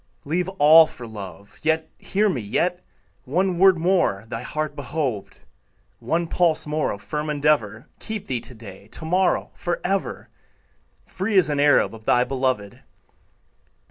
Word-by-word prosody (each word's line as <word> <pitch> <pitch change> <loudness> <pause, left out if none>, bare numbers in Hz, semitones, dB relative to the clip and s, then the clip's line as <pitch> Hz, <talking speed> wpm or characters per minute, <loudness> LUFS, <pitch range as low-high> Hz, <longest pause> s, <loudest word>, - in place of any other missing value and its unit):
Leave 175 +5 -1
all 155 +1 +8
for 125 -6 -10
love; 100 -3 -10
Yet, 160 0 0
hear 210 +2 +1
me, 140 - -1
yet, 175 - -1 0.4
One 180 +5 0
word 190 -1 +6
more 165 - +1
thy 115 0 -5
heart 155 -1 -4
behoved, 130 -9 -4 0.6
One 170 +1 -1
pulse 170 -1 +1
more 150 0 -1
of 100 0 -6
firm 150 +8 -3
endeavor, 145 -6 0
Keep 220 -2 -5
thee 125 -2 -2
to 125 - -11
day, 100 -3 -12
To 160 - -7
morrow, 180 +3 +1
forever, 180 +2 -3 0.8
Free 195 +2 -2
as 180 -5 +5
an 145 -1 -1
Arab 145 -4 +4
Of 110 -1 -12
thy 125 - +4
beloved. 125 -6 -2
150 Hz, 145 wpm, -23 LUFS, 115-175 Hz, 0.8 s, all